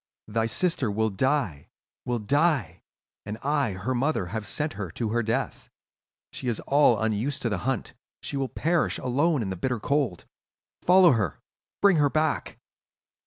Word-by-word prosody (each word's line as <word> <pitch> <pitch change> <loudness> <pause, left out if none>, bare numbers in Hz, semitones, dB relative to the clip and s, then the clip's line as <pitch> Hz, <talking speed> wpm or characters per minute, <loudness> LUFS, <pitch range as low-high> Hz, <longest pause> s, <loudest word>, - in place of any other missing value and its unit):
"'Thy 110 +1 0
sister 165 - 0
will 110 +1 0
die, 105 - 0 0.4
will 120 -1 0
die! 125 - +1 0.4
And 105 +1 -5
I, 140 -6 +1
her 100 +8 -3
mother, 130 -5 0
have 110 -2 -3
sent 150 +6 -2
her 100 -4 -5
to 110 +6 -3
her 120 +2 +1
death. 120 +4 -2 0.6
She - - -4
is 120 -3 -1
all 140 -6 +4
unused 110 +6 -1
to 120 - +1
the 100 -4 -1
hunt, 130 -5 -3 0.3
she - - -4
will 135 -2 -1
perish 165 +1 0
alone 140 +2 +1
in 95 - -3
the - - -3
bitter 125 +6 -2
cold! 135 - -1 0.6
Follow 180 -1 +6
her! 105 - 0 0.4
Bring 195 -4 +6
her 145 -1 +4
back! 155 +1 -1
125 Hz, 165 wpm, -26 LUFS, 105-145 Hz, 0.6 s, Follow